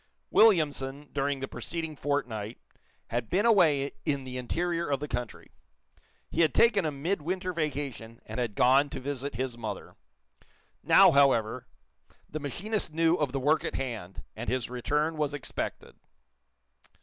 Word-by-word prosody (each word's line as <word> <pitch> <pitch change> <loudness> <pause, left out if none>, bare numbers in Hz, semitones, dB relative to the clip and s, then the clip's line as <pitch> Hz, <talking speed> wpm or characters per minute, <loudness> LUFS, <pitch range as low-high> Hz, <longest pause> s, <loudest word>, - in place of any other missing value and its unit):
Williamson, 145 -9 +3
during 140 -1 -1
the 135 - -3
preceding 160 +1 -4
fortnight, 125 -7 -2 0.5
had 120 0 -2
been 200 +5 +2
away 155 -11 +4
in 140 -2 -1
the 130 -1 -7
interior 170 +7 -1
of 140 -2 +1
the 150 - -4
country. 120 -3 -5 0.8
He 165 - +1
had 155 -5 +3
taken 210 -6 +4
a 155 - 0
midwinter 180 +4 -2
vacation, 140 -8 -4
and - - -5
had 115 -5 -2
gone 135 +3 +4
to - - -5
visit 140 0 -4
his 125 -1 -3
mother. 110 -3 -6 0.9
Now, - - +7
however, 135 -6 +3 0.6
the 155 - -5
machinist 185 - -3
knew 165 +1 +3
of 145 -4 0
the 135 - -2
work 150 +4 +2
at - - -3
hand, 115 -8 -5
and 115 +2 -4
his 125 -2 -1
return 150 +6 0
was 145 -1 -1
expected. 145 - -5
140 Hz, 150 wpm, -29 LUFS, 125-160 Hz, 0.9 s, Now